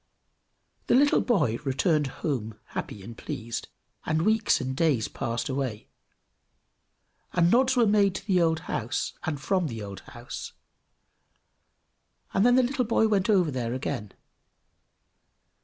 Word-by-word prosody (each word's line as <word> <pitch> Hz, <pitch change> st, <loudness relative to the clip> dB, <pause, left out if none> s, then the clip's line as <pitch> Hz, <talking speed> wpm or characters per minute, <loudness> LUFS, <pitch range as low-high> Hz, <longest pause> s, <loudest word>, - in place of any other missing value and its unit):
The -, -, +4 dB
little 285 Hz, +3 st, +5 dB
boy 150 Hz, -, +1 dB
returned 145 Hz, +2 st, +1 dB, 0.2 s
home 115 Hz, -8 st, -2 dB
happy 100 Hz, -, -6 dB
and 115 Hz, +3 st, -9 dB
pleased, 115 Hz, -3 st, -5 dB, 0.4 s
and 160 Hz, +1 st, 0 dB
weeks 220 Hz, +2 st, +3 dB
and 130 Hz, 0 st, -3 dB
days 140 Hz, -7 st, +2 dB
passed 120 Hz, -3 st, -3 dB
away, 130 Hz, -5 st, -3 dB, 1.4 s
and 175 Hz, 0 st, +3 dB
nods 260 Hz, +1 st, +4 dB
were 240 Hz, -, +5 dB
made 200 Hz, -2 st, +3 dB
to 190 Hz, -, -6 dB
the 185 Hz, -4 st, +3 dB
old 160 Hz, -1 st, +2 dB
house, -, -, -3 dB
and 150 Hz, -3 st, -2 dB
from 185 Hz, +3 st, 0 dB
the 115 Hz, -5 st, -6 dB
old 100 Hz, -1 st, -7 dB
house, -, -, -8 dB, 1.8 s
and 195 Hz, -, +3 dB
then 245 Hz, +1 st, +5 dB
the 255 Hz, -, +5 dB
little 250 Hz, 0 st, 0 dB
boy 220 Hz, 0 st, +3 dB
went 205 Hz, -1 st, +1 dB
over 185 Hz, -7 st, +3 dB
there 125 Hz, -2 st, -2 dB
again. 105 Hz, -5 st, -4 dB
160 Hz, 140 wpm, -27 LUFS, 125-210 Hz, 1.8 s, little